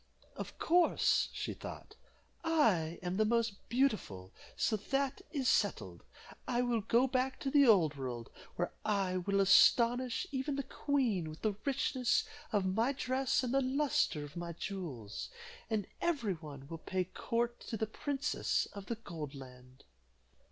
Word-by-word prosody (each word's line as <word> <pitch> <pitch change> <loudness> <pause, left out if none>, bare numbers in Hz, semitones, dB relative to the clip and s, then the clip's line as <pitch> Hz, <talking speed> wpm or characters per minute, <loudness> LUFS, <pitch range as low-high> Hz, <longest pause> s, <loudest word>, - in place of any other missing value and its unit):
"Of - - -7
course," 345 +1 +3
she - - -4
thought, - - -9 0.5
"I 215 - +2
am 180 +1 -2
the 215 - +4
most 225 -2 0
beautiful, 215 - 0 0.3
so 220 - +2
that 270 - -1
is 275 -6 -1
settled. - - +1 0.5
I 245 -1 +1
will 240 -2 +1
go 235 +4 +3
back 260 0 0
to 270 - -1
the 280 -2 +6
old 170 -9 +5
world, 125 -4 -5 0.2
where - - -2
I 195 -3 +1
will 195 +2 0
astonish 235 - +5
even 275 +1 -1
the 275 - -2
queen 245 - 0
with 155 - -11
the 215 -2 +2
richness 260 -2 +1 0.3
of 205 -4 +1
my 225 +8 +1
dress 265 0 0
and 250 0 -1
the 275 - +4
luster 275 - +1
of 145 0 -10
my 170 0 -4
jewels, 155 - -5 0.4
and 215 -3 0 0.2
every 275 - +1
one 145 -5 -10
will 165 +2 -7
pay 185 +2 -1
court 235 +6 -2
to 225 - -3
the 220 - 0
princess 285 +6 -1
of 200 -1 -8
the 235 - -2
Gold 160 -10 -7
Land." 125 -1 -13
220 Hz, 155 wpm, -34 LUFS, 175-265 Hz, 0.5 s, the